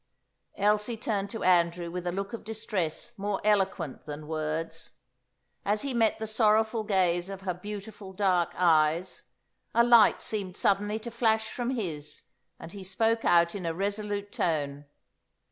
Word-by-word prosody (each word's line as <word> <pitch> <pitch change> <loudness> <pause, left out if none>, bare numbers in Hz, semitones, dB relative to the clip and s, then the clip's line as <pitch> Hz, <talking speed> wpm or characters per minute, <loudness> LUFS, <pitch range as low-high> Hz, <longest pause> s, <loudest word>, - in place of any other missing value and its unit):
Elsie 210 +3 +1
turned 205 -3 -2
to 225 - -5
Andrew 170 -1 +2
with 180 0 -4
a - - +1
look 195 +4 -4
of 230 - -6
distress 215 -7 -3
more 200 0 -1
eloquent 195 -9 0
than 150 +1 -6
words. 160 +1 -3 0.7
As 210 +1 0
he 275 -2 -2
met 225 -2 +2
the 220 - -4
sorrowful 220 +1 +2
gaze 185 -3 +1
of 195 -1 -7
her 185 -1 -2
beautiful 205 +1 -8
dark 185 -3 +2
eyes, 165 +1 +2 0.5
a 235 - +6
light 235 -2 +6
seemed 195 -4 -2
suddenly 205 +2 +2
to 235 +2 -7
flash 220 -1 +1
from 245 -1 -3
his, 150 -9 -4 0.4
and 165 - -9
he 200 0 -8
spoke 225 +4 +1
out 170 0 +4
in 200 - -5
a 165 -1 -2
resolute 205 +1 -2
tone. 145 -3 -1
195 Hz, 155 wpm, -28 LUFS, 170-215 Hz, 0.7 s, a